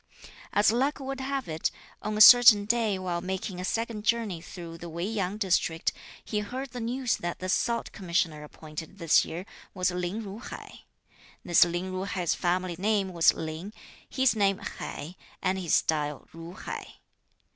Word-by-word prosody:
As 205 +1 +4
luck 270 +5 0
would 270 0 -5
have 270 -1 -3
it, 160 0 -1 0.3
on 210 0 -3
a - - +3
certain 225 -3 +10
day 220 -2 +1
while 180 -2 -3
making 185 0 -4
a - - -5
second 225 +1 -2
journey 220 -6 0
through 170 -1 -9
the 170 0 -7
Wei 170 +2 -3
Yang 205 -2 -2
district, 170 -5 +1 0.3
he 210 - -1
heard 255 +5 -5
the 250 - -6
news 245 +2 -1
that 175 0 -4
the 185 - -5
Salt 235 +4 0
Commissioner 170 -5 -1
appointed 155 +4 -9
this 165 -4 +4
year 175 +3 -6 0.3
was 185 -1 +1
Lin 180 +5 -3
Ju 200 +1 -7
hai. - - -10 0.6
This 175 - +6
Lin 175 +2 -2
Ju 185 +1 -3
hai's 180 -4 -1
family 180 0 -1
name 200 -2 +1
was 170 -1 +5
Lin, 160 +6 -6 0.4
his 260 -3 +2
name 195 -2 +2
Hai 165 +5 -7 0.2
and 190 0 0
his 175 -4 +2
style 150 -2 0
Ju 165 +1 -9
hai. - - -7
190 Hz, 170 wpm, -28 LUFS, 170-220 Hz, 0.6 s, certain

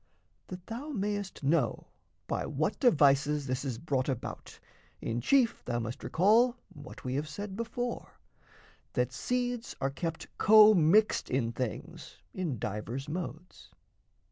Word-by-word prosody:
That 180 -1 -9
thou 245 +9 -6
mayst 205 - -3
know 155 +5 +1 0.4
by - - -2
what - - -1
devices 145 - +4
this 130 0 -2
Is 130 -5 -3
brought 135 -1 -1
about, 130 -3 -5 0.4
in 115 +1 -3
chief 245 - +2
thou 120 - -2
must 120 +3 -5
recall 225 +8 +4 0.2
What 145 0 -11
we 125 - -3
have 150 +3 -2
said 205 +5 -6
before, 235 +2 -4 0.8
that - - 0
seeds 245 -1 -2
are 135 - 0
kept 165 +3 -4
Commixed 215 -2 +6
in 125 -3 0
things 120 -3 -6 0.2
in 170 -9 -2
divers 110 +7 -4
modes. 155 - -7
160 Hz, 130 wpm, -30 LUFS, 135-215 Hz, 0.8 s, Commixed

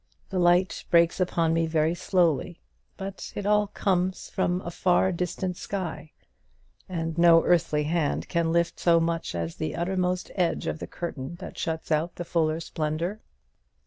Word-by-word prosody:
The 190 - 0
light 175 +1 +3
breaks 170 +1 +4
upon 170 -3 +1
me 165 0 +1
very 160 0 +2
slowly; 175 -2 +1 0.4
but 195 0 -6
it 205 - -4
all 210 0 +3
comes 185 -2 -1
from 180 -1 0
a 170 - -6
far 180 +2 +2
distant 180 +1 -3
sky; 175 -5 -5 0.8
and 165 -2 -3
no 170 -1 +7
earthly 165 -4 +2
hand 155 -1 0
can 170 -2 0
lift 170 0 +1
so 170 -1 +4
much 165 - -1
as 85 -1 -3
the 155 - -3
uttermost 180 0 -1
edge 175 -4 0
of - - -3
the - - -6
curtain 160 -3 -5
that 185 +2 -9
shuts 160 0 -3
out 160 +3 +1
the 175 - -5
fuller 160 -1 +1
splendour. 165 +5 -3
170 Hz, 160 wpm, -26 LUFS, 165-180 Hz, 0.8 s, no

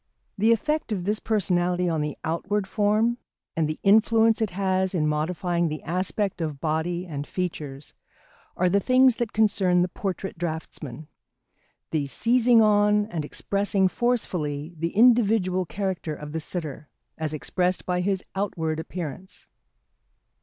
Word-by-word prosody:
The 220 +3 +3
effect 300 +3 0
of 190 -4 -1
this 210 +3 -1
personality 180 -4 0
on 160 -3 0
the 150 -1 -3
outward 195 +5 -1
form, 215 +4 +1 0.4
and 160 -2 +1
the 155 - -3
influence 225 +2 +4
it 220 - +1
has 190 0 0
in 155 -3 +1
modifying 170 +3 0
the 155 -1 -5
aspect 185 +2 -2
of 155 -4 -3
body 165 +3 -1
and 145 -4 -5
features, 150 -6 -5 0.6
are 180 - +3
the 195 +3 +3
things 255 +3 +4
that 235 -3 -2
concern 195 -5 +3
the - - 0
portrait 190 -1 -5
draughtsman: 160 -3 -5 0.8
the 150 -3 0
seizing 235 - +4
on 210 0 +4
and 160 -3 -2
expressing 195 +5 0
forcefully 175 - -1
the 165 +3 -3
individual 210 -6 +4
character 185 -5 -3
of 150 0 -8
the 160 - -2
sitter, 155 -3 -5 0.3
as 155 -1 -2
expressed 180 +4 -1
by 180 -1 0
his 190 0 -1
outward 165 -5 -2
appearance. 170 +1 -7
180 Hz, 140 wpm, -25 LUFS, 160-210 Hz, 0.8 s, influence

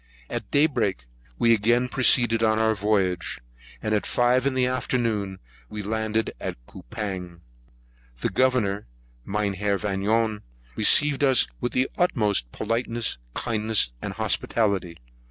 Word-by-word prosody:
At 115 -4 -4
day 145 +2 +4
break, 110 - -1 0.3
we 115 0 +4
again 120 +3 +2
proceeded 120 -3 +3
on 110 -1 +3
our 110 0 +2
voyage, 100 -4 0 0.5
and 110 - -1
at 105 - 0
five 125 +2 +2
in 135 - -1
the 130 -1 +2
afternoon 115 -6 -1 0.3
we 105 -1 -6
landed 110 +1 -1
at - - -4
Coupang. 90 - -7 0.8
The - - -1
Governor, 105 -3 +1 0.4
Mynheer 100 -1 -1
Vanion, 105 +2 0 0.3
received 145 -1 +4
us 130 -3 +5
with 120 - -3
the 130 +1 +2
utmost 105 - +1
politeness, 115 - -2 0.2
kindness, 110 - +1
and - - -4
hospitality. 100 -7 0
110 Hz, 125 wpm, -25 LUFS, 100-120 Hz, 0.8 s, us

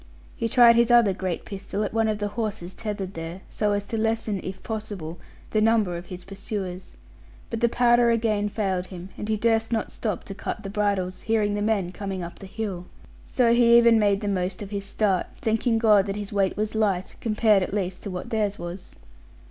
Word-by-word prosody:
He 230 - -2
tried 235 -1 +7
his 235 0 +4
other 235 -5 +6
great 185 -2 -3
pistol 200 +1 -4
at 210 - -3
one 225 0 +2
of 215 -1 0
the 205 0 -2
horses 205 -5 -4
tethered 205 -4 -5
there, 165 +3 -6
so 210 -1 0
as 205 0 -1
to 220 +1 -2
lessen 225 -3 -1
(if 190 0 -7
possible) 205 -7 -5 0.3
the 215 - +2
number 215 -5 +3
of 175 +1 -7
his 180 -1 -9
pursuers. 195 -2 -6 0.5
But 230 - -2
the 235 0 +3
powder 240 0 +4
again 220 -3 +1
failed 190 -4 -1
him; 185 0 -9
and 210 - -6
he 215 - +1
durst 225 +1 +1
not 225 -2 -1
stop 210 -5 -3
to 195 - -7
cut 210 +2 -5
the 195 - -5
bridles, 200 -3 -1
bearing 215 -2 +2
the 205 - -1
men 205 -4 0
coming 195 -1 -5
up 170 - -8
the 195 - -9
hill. 190 -4 -5 0.4
So 235 -2 +3
he 235 0 +6
even 235 -1 +6
made 200 -2 +2
the 205 - -3
most 185 0 -1
of 200 - -9
his 200 -1 -3
start, 195 -2 0
thanking 225 +1 +1
God 210 -3 +4
that 195 - -2
his 205 0 -5
weight 195 -2 +1
was 215 0 -1
light, 200 -4 0
compared 215 -2 +3
at 185 - -2
least 190 -2 -2
to 205 - -6
what 180 -1 -6
theirs 210 -2 0
was. 175 +2 -8
205 Hz, 210 wpm, -25 LUFS, 190-225 Hz, 0.5 s, tried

